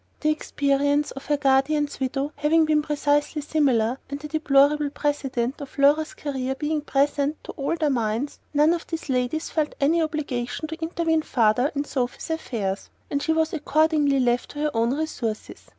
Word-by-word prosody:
The 305 - +3
experience 285 -1 +1
of 270 - -9
the 295 0 +2
guardian's 285 +2 +1
widow 270 +2 -1
having 310 +2 +3
been 305 -1 +3
precisely 295 0 0
similar, 265 -5 +1
and 280 0 -4
the 300 - -7
deplorable 295 -1 +3
precedent 275 -3 -2
of 280 - -9
Laura's 290 +3 +3
career 265 -2 -3
being 300 +2 -1
present 285 +1 +1
to - - -7
all 280 +4 -2
their 305 -3 +1
minds, 235 +2 -1
none 300 +3 +4
of 340 - -4
these 325 -3 -5
ladies 255 +5 -1
felt 305 -2 -1
any 320 +4 +3
obligation 295 -3 -3
to 320 +1 -7
intervene 325 -1 0
farther 245 -1 +2
in 285 - 0
Sophy's 255 +3 -3
affairs; 210 -11 -3 0.2
and 285 - 0
she 320 - 0
was 320 0 +1
accordingly 300 -2 +2
left 245 -1 +1
to 290 - -8
her 300 0 +1
own 230 +3 +2
resources. 235 -9 -4
290 Hz, 170 wpm, -24 LUFS, 265-310 Hz, 0.2 s, none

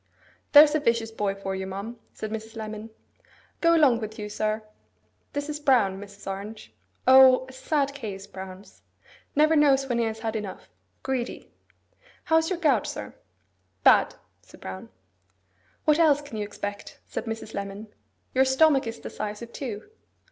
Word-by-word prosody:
'There's 295 0 +9
a 310 - +2
vicious 230 -4 0
boy 205 -3 -1
for 195 -1 -4
you, 190 0 -4
ma'am,' 200 +5 -6
said 215 - -6
Mrs. 220 +1 -6
Lemon. 215 0 -6 0.7
'Go 335 0 +5
along 275 -8 +5
with 220 -1 -6
you, 210 -1 -5
sir. 215 +1 -2 0.7
This 285 0 -3
is 300 -1 -4
Brown, 235 -10 +3
Mrs. 200 0 -12
Orange. 195 - -7 0.3
O, 260 0 +8
a - - -11
sad 280 +1 -1
case, 205 -8 -6
Brown's! 190 +1 -11 0.5
Never 310 +2 +4
knows 275 -3 +4
when 240 -2 0
he 230 - +2
has 220 0 -4
had 225 -1 -3
enough. 210 -3 -6 0.3
Greedy. 260 -2 -3 0.7
How 320 - +3
is 320 0 +1
your 370 - -1
gout, 285 - +2
sir?' - - -6 0.7
'Bad,' - - +5 0.3
said - - -17
Brown. 95 0 -8 1.0
'What 305 +1 +4
else 300 -4 +5
can 285 -6 -9
you 210 - -2
expect?' 205 0 -7
said - - -5
Mrs. 225 -1 -6
Lemon. 200 +2 -6 0.4
'Your 260 - +5
stomach 265 0 +4
is 225 +1 -5
the - - -8
size 210 +1 -5
of 235 - -11
two. 230 - -6
225 Hz, 165 wpm, -26 LUFS, 205-275 Hz, 1.0 s, There's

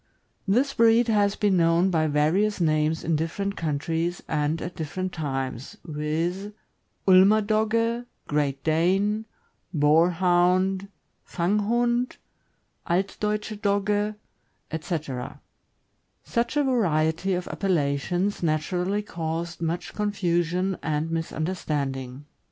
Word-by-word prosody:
This 255 +8 +2
breed 230 +1 +4
has 205 -2 +3
been 200 -3 +2
known 170 +2 +3
by 160 -2 +2
various 160 +9 +2
names 155 -1 +1
in 165 0 +1
different 195 +6 -2
countries 165 +3 -2
and 155 +1 0
at 175 +2 -6
different 185 +3 -4
times, 135 -5 -4
viz.: 165 +5 -2 0.6
Ulmer 190 +3 +7
Dogge, 230 +3 +1 0.2
Great 140 -2 -1
Dane, 195 +7 +1 0.5
Boarhound, 180 +4 +3 0.4
Fanghund, 235 +7 0 0.7
Altdeutsche 210 +3 -1
Dogge, 205 0 +1 0.6
etc. 155 -6 -4 0.8
Such 235 +5 -1
a 295 - +4
variety 180 - +1
of 180 0 -4
appellations 175 +2 0
naturally 180 +5 0
caused 170 -2 -4
much 165 +1 -3
con 210 -1 -1
fusion 180 0 0
and 155 +1 -1
misunderstanding. 145 -5 -3
175 Hz, 100 wpm, -25 LUFS, 155-205 Hz, 0.8 s, Ulmer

